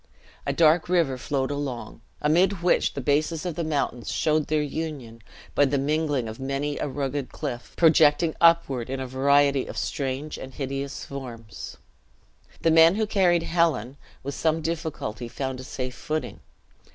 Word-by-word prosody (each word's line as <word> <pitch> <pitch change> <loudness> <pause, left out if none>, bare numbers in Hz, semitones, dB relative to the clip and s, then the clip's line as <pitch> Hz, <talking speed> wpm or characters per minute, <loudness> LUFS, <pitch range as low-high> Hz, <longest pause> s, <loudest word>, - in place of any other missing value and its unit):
A - - +2
dark 165 +1 +4
river 170 -7 +2
flowed 135 +1 -2
along, 140 -5 -5 0.2
amid 175 +4 +2
which 180 - +2
the 140 - -3
bases 155 +4 0
of 175 - -2
the 170 - -3
mountains 140 -6 -2
showed 155 -1 +1
their 155 -1 +1
union 140 -7 -5 0.3
by 145 - +4
the 140 +1 +1
mingling 145 -3 0
of 110 +2 -7
many 140 +2 -2
a - - -1
rugged 140 -1 -3
cliff, 125 -6 -6
projecting 160 0 +5
upward 140 -8 +4
in 135 0 -3
a 130 - -3
variety 140 +1 +3
of - - -7
strange 140 +1 -3
and 130 0 -9
hideous 135 0 -4
forms. 120 -6 -8 0.9
The 165 - +4
men 165 +2 +7
who 220 +1 +1
carried 180 -5 +3
Helen, 160 -8 +1 0.3
with 140 +1 -4
some 160 +1 0
difficulty 155 -9 -4
found 130 +1 -4
a - - -7
safe 130 -1 -5
footing. 155 +2 -4
145 Hz, 160 wpm, -25 LUFS, 130-160 Hz, 0.9 s, men